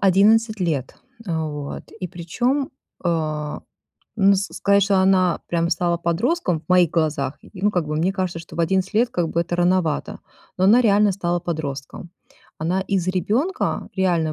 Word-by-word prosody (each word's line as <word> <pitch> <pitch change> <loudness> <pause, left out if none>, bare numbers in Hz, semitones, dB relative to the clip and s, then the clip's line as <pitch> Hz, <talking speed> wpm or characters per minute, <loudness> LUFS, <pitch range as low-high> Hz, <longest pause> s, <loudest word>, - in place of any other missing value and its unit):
11 215 +3 +4
лет, 150 -8 -1 0.3
а 160 -2 -1
вот, 145 -1 -6
и 180 - -2
причём, 245 - -1 0.3
э, 155 -3 -1 0.6
ну, 200 -1 +5
с 195 +2 -1
сказать, 200 0 +3
что 195 0 +2
она, 185 -2 +3
прямо, 170 0 0
стала 170 0 +1
подростком 175 - 0
в - - -32
моих 180 -3 +4
глазах, 150 -4 -1
и, - - -16
ну, 200 +3 +1
как 175 -6 -1
бы 150 0 -2
мне 180 +5 +1
кажется, 185 -3 -2
что 165 - -11
в - - 0
11 190 +4 0
лет 235 +3 +3
как 170 -2 -1
бы 170 - 0
это 175 +1 -2
рановато, 175 -3 0 0.4
но 185 - +2
она 225 +6 +6
реально 210 -3 +4
стала 175 -2 -1
подростком. 155 -2 -5 0.5
Она 175 +4 0
из 190 -2 -1
ребёнка, 240 - -1
реально 170 -4 +1
180 Hz, 170 wpm, -22 LUFS, 165-195 Hz, 0.6 s, она